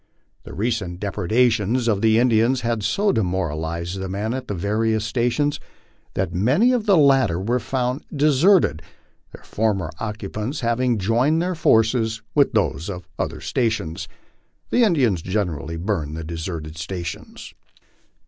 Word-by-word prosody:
The - - -9
recent 100 -4 -2
depredations 115 +4 +1
of 105 -3 +1
the 110 0 +4
Indians 120 +1 +3
had 115 -2 -1
so 200 - +1
demoralized 85 -2 -2
the 95 0 -4
men 105 +4 -2
at 130 0 -5
the 100 - -3
various 110 +4 0
stations 125 +6 0 0.6
that - - -1
many 135 - +3
of 235 -4 0
the 195 -3 +5
latter 135 - +4
were 120 +6 0
found 125 +1 -2
deserted, 150 - +3 0.5
their - - -13
former 100 -6 -1
occupants 110 +4 -4
having 120 0 +1
joined 120 - +2
their 180 +2 0
forces 115 -7 +2
with 140 -3 +3
those 95 - 0
of 90 -2 -7
other 75 - -3
stations. 85 -2 -2 0.6
The 245 - +4
Indians 130 - +2
generally 85 -5 -2
burned 80 -5 -2
the 80 - -5
deserted 80 -1 -6
stations. 85 +1 -6
110 Hz, 140 wpm, -22 LUFS, 90-125 Hz, 0.6 s, the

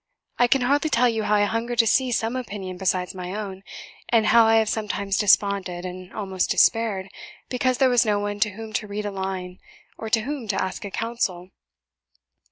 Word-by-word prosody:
I 245 - +5
can 270 +2 +2
hardly 285 +5 +2
tell 250 -3 +3
you 225 -2 0
how 210 - +2
I 205 - +3
hunger 230 +3 -1
to 230 -1 +4
hear 255 +3 +2
some 225 +1 -1
opinion 200 -7 -5
besides 185 -1 -1
my 180 0 -6
own, 195 -3 -6 0.5
and 225 -2 +3
how 225 +1 +6
I 225 - +4
have 220 -1 +3
sometimes 200 -2 -2
desponded, 195 -3 +2
and 185 0 -8
almost 190 -3 -2
despaired, 215 -4 +2 0.4
because 255 0 0
there 265 - +4
was 245 -1 +4
no 210 -3 +1
one 205 0 -3
to 210 - +2
whom 215 +2 -9
to 215 - -2
read 205 +1 -4
a 205 - -3
line, 190 -2 -5 0.4
or 225 - -5
of 220 - +3
whom 245 +2 -4
to 195 -2 -1
ask 190 0 -3
a - - -5
counsel. 195 -5 -3
210 Hz, 200 wpm, -24 LUFS, 190-230 Hz, 0.5 s, how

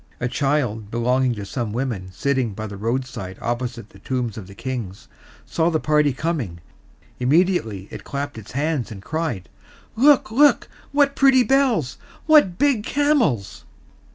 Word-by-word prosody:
A 125 - -1
child 125 -6 -1
belonging 125 +2 +1
to 100 -2 -6
some 110 +1 -4
women 115 -7 -3
sitting 130 0 -1
by 110 - -5
the 100 -1 -7
roadside 115 -3 -4
opposite 120 -2 -4
the 100 - -16
Tombs 125 0 -3
of 100 -4 -8
the 100 - -13
Kings 115 -6 -6 0.4
saw 165 0 +1
the 160 -2 0
party 150 -1 +2
coming; 130 - -3 0.6
immediately 125 - +1
it - - -8
clapped 140 -3 -5
its 110 - -12
hands, 145 -3 -1
and 95 -3 -9
cried, 155 - -3 0.5
"Look, 270 -1 +4
look! 290 +5 +4 0.2
What 280 -1 +3
pretty 270 -2 +5
bells! 255 - +1 0.3
What 295 - +5
big 280 -4 +2
camels!" 260 - 0
130 Hz, 150 wpm, -22 LUFS, 110-170 Hz, 0.6 s, pretty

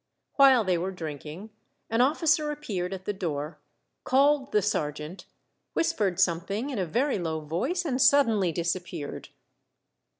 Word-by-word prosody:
While 270 -4 +7
they 180 -3 +1
were 185 +3 -2
drinking, 160 +3 -7 0.4
an 225 +2 +1
officer 305 +2 +2
appeared 205 -12 -4
at 190 -1 -7
the 205 - -1
door, 150 -5 -4 0.4
called 275 +1 +3
the 210 - +2
sergeant, 150 -3 -3 0.5
whispered 200 - 0
something 195 +10 0
in 245 - -3
a 185 - -1
very 245 - 0
low 160 -2 -2
voice, 235 - -2
and 260 -4 -1
suddenly 230 -10 +4
disappeared. 170 -2 -4
195 Hz, 135 wpm, -27 LUFS, 170-270 Hz, 0.5 s, While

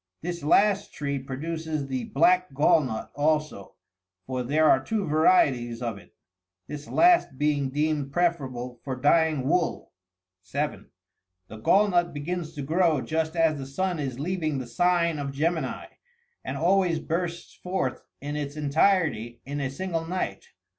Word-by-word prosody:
This 175 0 -4
last 200 +6 +3
tree 140 -1 -3
produces 155 +3 -4
the 130 -2 -3
black 180 0 +2
gall 150 +2 +5
nut 110 -4 -5
also 150 -7 -1 0.2
— 90 0 -60
for 130 +2 -3
there 150 +5 +2
are 130 -2 +4
two 210 +5 -1
varieties 140 -7 +3
of 115 -4 -4
it 90 - -20 0.3
— 90 0 -59
this 150 0 -7
last 345 - +4
being 145 -1 +1
deemed 145 0 -1
preferable 135 -8 -1
for 135 -2 -3
dyeing 145 0 +2
wool. 175 +2 0 0.5
(7.) 90 -1 -4 0.6
The 110 - -9
gall 195 - +4
nut 175 -4 +1
begins 160 +2 -4
to 145 - -4
grow 160 -1 +2
just 160 +2 -2
as 160 -3 +2
the 135 - -6
sun 180 +4 -2
is 135 -3 -4
leaving 155 -2 -1
the 130 - -4
sign 170 +4 +1
of 140 -1 -3
Gemini,63 160 +4 -1 0.6
and - - -3
always 180 -1 +2
bursts 170 +1 -3
forth 180 -8 -3 0.2
in 145 +1 -5
its 145 -1 -4
entirety 145 - +1
in 145 +1 -4
a 135 - -1
single 165 +3 -3
night. 185 +2 -3
150 Hz, 155 wpm, -26 LUFS, 135-170 Hz, 0.6 s, gall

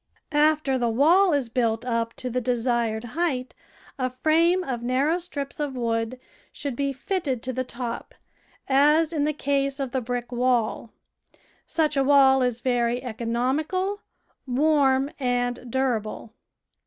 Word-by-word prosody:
After 300 -3 +2
the 240 -1 +1
wall 335 - +4
is 285 -5 +1
built 230 -1 0
up 230 -2 -1
to 250 - -5
the 250 +2 -1
desired 235 -2 0
height, 255 0 -2 0.5
a 255 0 0
frame 330 +7 +2
of 250 -7 -4
narrow 270 +8 +1
strips 285 -6 -6
of 290 -3 -2
wood 230 0 -2 0.3
should 280 -4 -5
be 280 +2 -1
fitted 275 -3 -3
to 255 - -3
the 255 +1 -1
top, 240 -1 -6 0.5
as 300 +4 +4
in 295 -2 +1
the 305 - +1
case 275 -1 -1
of 270 -3 -3
the 260 - -1
brick 245 +1 -4
wall. 240 -2 0 0.8
Such 310 -2 +1
a 275 - +3
wall 270 -1 +5
is 245 -2 0
very 245 -1 0
economical, 265 - -1 0.5
warm, 275 0 +2
and 245 -1 -1
durable. 230 -4 -2
260 Hz, 140 wpm, -25 LUFS, 240-290 Hz, 0.8 s, wall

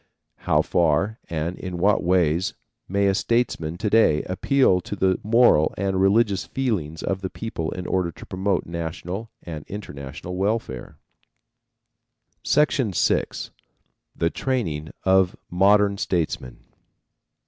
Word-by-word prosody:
How - - +4
far 90 +6 +1
and 85 +2 -3
in 90 -2 -5
what 100 +3 +2
ways 85 -1 +2 0.3
may 100 +1 +1
a 100 - +3
statesman 100 -7 0
to 110 - -2
day 105 -8 +4
appeal 95 0 +2
to 105 - -6
the 95 -1 +1
moral 110 -8 +4
and 95 0 0
religious 100 0 +3
feelings 95 - -2
of 95 -1 -2
the 95 - -3
people 80 -9 -4
in 90 -1 -6
order 90 -2 0
to - - -12
promote 95 0 -1
national 85 +5 -5
and 80 -4 -7
international 75 -3 -7
welfare? 100 - -2 1.5
VI. 150 +1 +4 1.5
THE 85 0 0
TRAINING 85 - -2
OF 95 -1 +3 0.2
MODERN 100 +2 +4
STATESMEN. 80 -8 -2
95 Hz, 120 wpm, -23 LUFS, 85-105 Hz, 1.5 s, How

